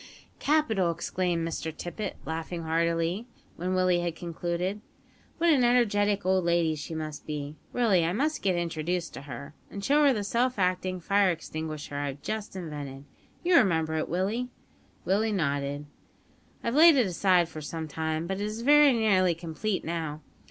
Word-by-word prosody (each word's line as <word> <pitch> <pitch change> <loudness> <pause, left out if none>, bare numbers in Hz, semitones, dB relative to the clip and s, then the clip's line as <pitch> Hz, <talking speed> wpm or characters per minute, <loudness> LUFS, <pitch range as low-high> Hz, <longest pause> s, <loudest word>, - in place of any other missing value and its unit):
"Capital!" 240 - +2
exclaimed 170 0 -1
Mr 160 0 -3
Tippet, 180 +5 -5
laughing 165 +1 -4
heartily, 165 +6 0 0.3
when 185 +2 -2
Willie 185 -1 +3
had 175 -2 -2
concluded; 175 +3 -3 0.6
"what 340 0 +4
an 270 -5 +4
energetic 205 -5 +2
old 185 0 +3
lady 170 -2 +2
she 155 +2 -6
must 155 -1 -6
be! 150 -1 -4 0.2
Really, 215 -8 +3
I 165 - +1
must 295 - 0
get 190 -2 +1
introduced 170 +1 -2
to 135 - -7
her, 140 0 -8 0.2
and 200 0 -6
show 295 +2 +4
her 285 - +6
the 215 -5 -1
self 245 +4 0
acting 185 0 0
fire 200 +2 +3
extinguisher 155 -3 -4
I 145 0 -1
have 140 +1 -7
just 215 -2 -4
invented. 145 -6 -6 0.4
You 355 -1 +5
remember 160 - +3
it, 155 0 -1
Willie?" 205 +8 -1 0.6
Willie 215 +4 +2
nodded. 145 -4 -1 0.8
"I've 230 - -1
laid 320 +2 +8
it 255 -4 +4
aside 180 -1 +3
for 155 -2 -8
some 160 +2 -5
time; 160 +1 -2
but 190 +2 -3
it - - 0
is 215 +2 -4
very 295 0 +7
nearly 190 -6 +3
complete 170 +5 -3
now. 160 -2 -3
175 Hz, 165 wpm, -28 LUFS, 160-210 Hz, 0.8 s, laid